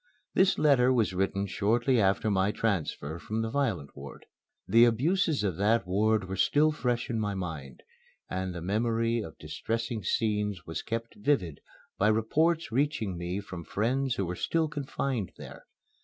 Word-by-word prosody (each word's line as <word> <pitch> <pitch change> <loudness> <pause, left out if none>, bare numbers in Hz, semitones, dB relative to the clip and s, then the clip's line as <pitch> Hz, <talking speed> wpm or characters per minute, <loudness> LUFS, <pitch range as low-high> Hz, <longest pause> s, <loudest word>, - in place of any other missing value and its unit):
This 190 0 +4
letter 130 -4 +4
was 115 -7 +2
written 95 +1 0
shortly 110 +6 +1
after 100 +2 +2
my 95 +1 +2
transfer 85 -7 -2
from 110 +5 -3
the 110 - -3
violent 115 - -1
ward. 70 -1 -10 0.4
The 115 +1 +6
abuses 145 - +2
of 95 -5 -1
that 105 +1 +2
ward 105 +2 +1
were 95 +1 -4
still 145 +11 +3
fresh 120 -5 -1
in 115 -3 -2
my 105 -2 -1
mind, 80 -8 -6 0.4
and 95 0 -3
the 85 -2 -6
memory 115 +4 0
of 80 -7 -9
distressing 115 -1 -3
scenes 105 -2 -1
was 80 - -4
kept 115 0 -4
vivid 105 - 0 0.4
by 105 - +4
reports 150 +9 +2
reaching 120 - 0
me 90 +3 -3
from 95 -4 -8
friends 125 +7 0
who 100 - -1
were 90 +1 -3
still 165 - 0
confined 135 - -3
there. - - -11
110 Hz, 160 wpm, -29 LUFS, 95-125 Hz, 0.4 s, The